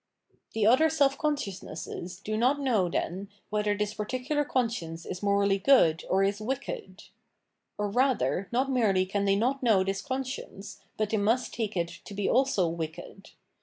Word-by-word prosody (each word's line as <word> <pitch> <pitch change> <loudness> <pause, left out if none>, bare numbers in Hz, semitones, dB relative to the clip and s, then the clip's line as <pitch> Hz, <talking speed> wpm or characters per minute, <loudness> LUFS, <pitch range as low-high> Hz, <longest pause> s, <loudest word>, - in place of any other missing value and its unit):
The 220 -2 +1
other 260 +8 +5
self 280 -3 +3
consciousnesses 190 - -4
do 215 +2 -4
not 255 +6 +2
know, 225 -10 +1
then, 190 +3 -3 0.2
whether 210 -1 0
this 210 0 -1
particular 255 +8 -1
conscience 225 - -2
is 180 - -6
morally 200 -1 +2
good 190 - +4
or 190 +1 +3
is 200 +2 0
wicked; 215 -5 -5 0.7
or, 210 - -1
rather, 245 -4 +1
not 260 +3 +1
merely 205 -7 +2
can 200 +1 -1
they 195 0 +3
not 255 +7 0
know 220 -7 +4
this 195 +1 -2
conscience, 260 -6 -5 0.2
but 215 -1 -1
they 220 - +2
must 225 +5 +1
take 215 -4 -3
it 170 -1 0 0.2
to 200 - -9
be 200 0 -1
also 255 -8 +2
wicked. 165 +4 -6
210 Hz, 165 wpm, -28 LUFS, 195-255 Hz, 0.7 s, other